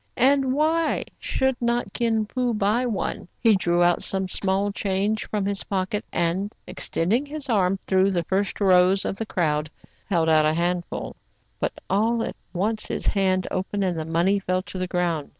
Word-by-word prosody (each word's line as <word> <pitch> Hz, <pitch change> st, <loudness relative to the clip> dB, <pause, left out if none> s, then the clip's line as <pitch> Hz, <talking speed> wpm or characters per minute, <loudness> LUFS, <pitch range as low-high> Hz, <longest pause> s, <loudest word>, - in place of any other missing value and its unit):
And 270 Hz, +1 st, +4 dB
why 315 Hz, +2 st, +1 dB, 0.2 s
should 265 Hz, -1 st, 0 dB
not 240 Hz, 0 st, 0 dB
Kin 225 Hz, -2 st, +1 dB
Fo 245 Hz, +1 st, -1 dB
buy 210 Hz, +5 st, +1 dB
one.^ 215 Hz, -5 st, -3 dB
He 225 Hz, -3 st, +5 dB
drew 175 Hz, -2 st, +2 dB
out 175 Hz, 0 st, +3 dB
some 190 Hz, -1 st, -1 dB
small 195 Hz, +2 st, 0 dB
change 200 Hz, +2 st, -1 dB
from 210 Hz, -2 st, -1 dB
his 200 Hz, -1 st, -2 dB
pocket, 195 Hz, +1 st, -2 dB
and, 180 Hz, +5 st, 0 dB, 0.2 s
ex -, -, -5 dB
tending 210 Hz, +11 st, +1 dB
his 290 Hz, -1 st, -7 dB
arm 195 Hz, -4 st, +2 dB
through 190 Hz, 0 st, +3 dB
the 175 Hz, -3 st, 0 dB
first 195 Hz, +4 st, -1 dB
rows 190 Hz, -1 st, +4 dB
of 195 Hz, -, -2 dB
the 225 Hz, -, -4 dB
crowd, 150 Hz, -5 st, 0 dB, 0.4 s
held 170 Hz, -5 st, +1 dB
out 155 Hz, -1 st, +5 dB
a 155 Hz, -, +1 dB
handful; 175 Hz, +1 st, -2 dB, 0.4 s
but -, -, -1 dB
all 225 Hz, +4 st, +1 dB
at -, -, -4 dB, 0.2 s
once 210 Hz, +4 st, -1 dB
his -, -, -3 dB
hand 190 Hz, -2 st, +1 dB
opened, 200 Hz, +2 st, -2 dB
and 180 Hz, -2 st, 0 dB
the -, -, -2 dB
money 170 Hz, +5 st, +1 dB
fell 185 Hz, -1 st, -1 dB
to 190 Hz, -, -7 dB
the 185 Hz, -, -1 dB
ground. 175 Hz, -4 st, -1 dB
195 Hz, 185 wpm, -24 LUFS, 180-220 Hz, 0.4 s, He